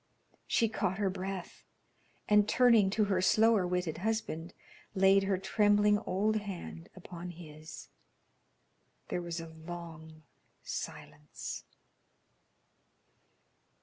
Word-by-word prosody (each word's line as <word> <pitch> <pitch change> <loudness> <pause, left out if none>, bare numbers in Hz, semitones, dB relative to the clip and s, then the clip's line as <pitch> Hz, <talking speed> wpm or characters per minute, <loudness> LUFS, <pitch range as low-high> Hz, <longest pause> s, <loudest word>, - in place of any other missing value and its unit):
She 230 - +3
caught 190 -4 -1
her 200 -2 +1
breath, 190 -1 -6 0.6
and 210 0 +4
turning 235 -6 +5
to 215 +2 +1
her 195 -3 +1
slower 215 0 +4
witted 180 -3 -2
husband, 185 -5 -3 0.4
laid 195 +1 +5
her 195 -1 +1
trembling 205 +2 +3
old 210 +4 +1
hand 175 - -7
upon 180 -1 -8
his. 155 -2 -10 1.2
There 175 - -1
was 170 -1 -4
a 165 0 -7
long 160 -1 -9 0.4
silence. - - -6
190 Hz, 100 wpm, -32 LUFS, 170-205 Hz, 1.2 s, turning